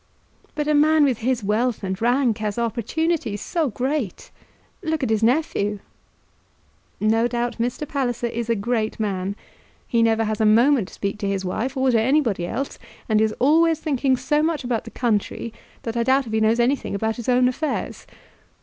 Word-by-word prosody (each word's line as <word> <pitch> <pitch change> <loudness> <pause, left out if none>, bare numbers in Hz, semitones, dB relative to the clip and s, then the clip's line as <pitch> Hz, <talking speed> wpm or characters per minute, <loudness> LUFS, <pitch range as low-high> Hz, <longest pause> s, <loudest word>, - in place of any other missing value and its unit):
"But 295 -1 -2
a 300 - +3
man 305 +1 +5
with 260 -5 +2
his 245 -1 0
wealth 220 +3 0
and 190 +1 -3
rank 240 -1 +2
has 210 0 -3
opportunities 235 +1 -1
so 320 - -1
great! 255 - -3 0.5
Look 320 -4 -2
at 235 - 0
his 220 -1 +1
nephew!" 225 -5 +1 1.2
"No 225 +2 +2
doubt 240 0 -2
Mr. 245 +5 -2
Palliser 245 -4 -2
is 235 0 -3
a 230 - +3
great 220 +1 -1
man. 195 -2 -2 0.5
He 235 - +2
never 225 0 +3
has 215 0 -2
a - - +4
moment 235 0 +4
to - - -15
speak 200 +1 -3
to 200 - -2
his 195 -1 -2
wife 245 +9 -2
or 260 0 +3
to 230 -2 +3
anybody 230 - +1
else; 275 +9 -4 0.3
and 215 -1 +3
is 220 0 +1
always 325 +4 +3
thinking 270 -4 +1
so 280 +4 +1
much 315 -2 0
about 240 -2 -2
the - - -7
country 230 -1 -2 0.3
that 230 0 -4
I 235 - +1
doubt 265 +3 +2
if 220 - -7
he 220 - +2
knows 220 +2 +3
anything 250 -2 +1
about 220 +2 -1
his 235 +1 -4
own 250 0 +4
affairs. 295 +5 -3
235 Hz, 185 wpm, -22 LUFS, 220-270 Hz, 1.2 s, man